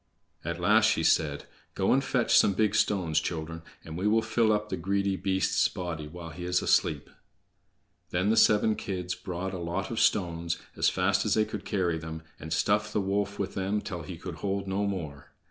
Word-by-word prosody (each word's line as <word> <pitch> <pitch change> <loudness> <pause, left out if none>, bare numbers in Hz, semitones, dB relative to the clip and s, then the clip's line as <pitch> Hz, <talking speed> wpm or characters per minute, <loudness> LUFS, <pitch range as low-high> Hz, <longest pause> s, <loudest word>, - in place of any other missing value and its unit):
At - - -4
last - - +4
she - - +1
said: 75 -2 +2 0.3
"Go 95 - +2
and 135 +1 +2
fetch 125 -3 +2
some 100 - +5
big 105 +1 +1
stones, 90 -8 +2
children, 80 0 -4 0.2
and 80 - -7
we 95 +4 -1
will 110 +1 +3
fill 110 0 +2
up 105 0 0
the - - -1
greedy 100 +2 0
beast's 95 0 +1
body 85 -4 -5
while 85 +1 -9
he 90 +4 -8
is 90 0 +1
asleep." - - +2 1.0
Then 90 +4 +1
the - - +3
seven 105 0 +4
kids 90 -2 -4
brought 95 +1 -5
a 95 - -4
lot 85 +5 -3
of 115 - -2
stones, 85 -3 +1 0.2
as - - +3
fast 100 +2 +1
as 105 - +1
they 110 - +3
could 105 -2 -7
carry 90 -5 0
them, 80 0 -7 0.2
and 80 - -8
stuffed 105 +4 +1
the - - +1
wolf 100 +1 -1
with 100 -1 -3
them 95 +2 -1
till 90 -4 -6
he 85 +2 -8
could 85 0 -7
hold 100 +1 -2
no 100 +2 0
more. 80 -8 -6
95 Hz, 200 wpm, -28 LUFS, 85-100 Hz, 1.0 s, some